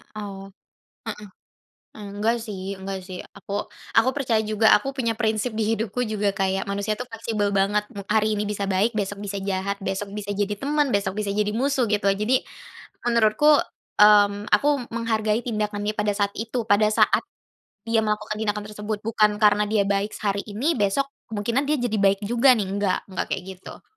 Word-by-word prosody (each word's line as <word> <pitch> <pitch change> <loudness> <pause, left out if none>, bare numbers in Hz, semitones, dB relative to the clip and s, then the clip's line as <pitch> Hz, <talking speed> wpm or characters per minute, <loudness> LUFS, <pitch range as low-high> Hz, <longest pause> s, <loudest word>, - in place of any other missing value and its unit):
Oh. 200 -2 -7 1.5
Heeh. 205 -2 -8
Enggak 225 +3 +1
sih 200 -3 -6
enggak 190 0 -5
sih. 185 -1 -8 0.2
Aku 200 +1 -4 0.3
aku 235 +3 +5
percaya 245 -6 +1
juga. 215 +1 +3
Aku 270 +4 -5
punya 230 -4 -1
prinsip 220 +1 0
di 220 - +1
hidupku 225 +3 -2
juga 210 -2 0
kayak, 195 -1 0
manusia 200 +2 -1
itu 245 - -5
fleksibel 220 -2 -1
banget. 200 +1 +2 0.2
Hari 215 0 +2
ini 210 - 0
bisa 200 -1 -2
baik, 200 +5 +2
besok 205 -1 -2
bisa 200 0 -4
jahat. 200 +1 -2
Besok 195 +1 -3
bisa 205 -1 -5
jadi 205 0 -1
teman, 285 +4 0
besok 195 0 0
bisa 205 -1 -1
jadi 210 0 +1
musuh, 255 +1 +1
gitu. 205 -1 +1
Jadi, 210 +6 +2 0.6
menurutku, 235 +5 +4 0.5
mmm, 205 0 +6
aku 290 - +4 0.3
menghargai 220 -1 0
tindakan 210 -3 -2
dia 210 - -1
pada 210 0 +1
saat 200 0 0
itu. 230 +2 -2
Pada 205 +1 +5
saat - - +3 0.7
dia 225 -1 +3
melakukan 210 0 -2
tindakan 210 -1 -1
tersebut. 210 0 -4
Bukan 215 -1 +3
karena 210 0 +5
dia 210 -1 +2
baik 200 +1 0
sehari 200 -1 -1
ini, 255 +11 0
besok 205 +8 +1 0.2
kemungkinan 230 +6 0
dia 305 - +2
jadi 220 -3 0
baik 195 0 +3
juga 240 +4 +4
nih, 205 -4 -1
nggak, 195 -2 +1
nggak 185 - -2
kayak 190 - -2
gitu. - - -12
210 Hz, 175 wpm, -24 LUFS, 200-225 Hz, 1.5 s, mmm